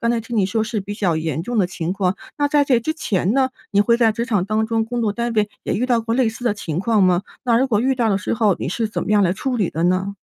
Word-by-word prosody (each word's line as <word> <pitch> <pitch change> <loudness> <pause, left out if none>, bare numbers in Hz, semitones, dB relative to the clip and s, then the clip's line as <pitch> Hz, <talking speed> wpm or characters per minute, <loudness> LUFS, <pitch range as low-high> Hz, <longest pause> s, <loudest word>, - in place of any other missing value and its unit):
刚 235 -2 +1
才 235 -1 0
听 230 +1 -5
你 200 -3 +3
说 220 +3 0
是 215 -1 -3
比 200 +2 -6
较 185 -6 0
严 160 -1 -2
重 240 +5 -2
的 190 - +3
情 175 -1 -3
况。 190 -1 0 0.2
那 290 0 +2
在 290 0 +3
这 255 -4 +2
之 315 +7 -2
前 195 - 0
呢， 265 0 +2 0.2
你 205 - +3
会 235 +3 +3
在 230 -2 +3
职 230 +2 -2
场 210 -7 0
当 215 +2 0
中 225 0 0
工 240 +2 -3
作 215 -3 0
单 235 +2 -2
位 215 -1 +2 0.2
也 - - -1
遇 240 - 0
到 240 -2 +2
过 225 0 -2
类 250 -2 +2
似 225 +2 -7
的 235 -4 +1
情 165 -6 -4
况 210 +2 +2
吗？ 180 0 +3 0.2
那 235 -2 +3
如 265 - +2
果 215 -5 +1
遇 265 +3 +2
到 240 -3 +1
的 200 - +2
时 205 - -3
候， 210 -4 +2
你 - - -3
是 220 +6 -1
怎 - - -3
么 - - -4
样 210 -1 +4
来 180 -2 +2
处 250 +6 -2
理 200 -7 +1
的 165 - -3
呢？ 185 +2 0
220 Hz, 340 characters per minute, -20 LUFS, 195-235 Hz, 0.2 s, 样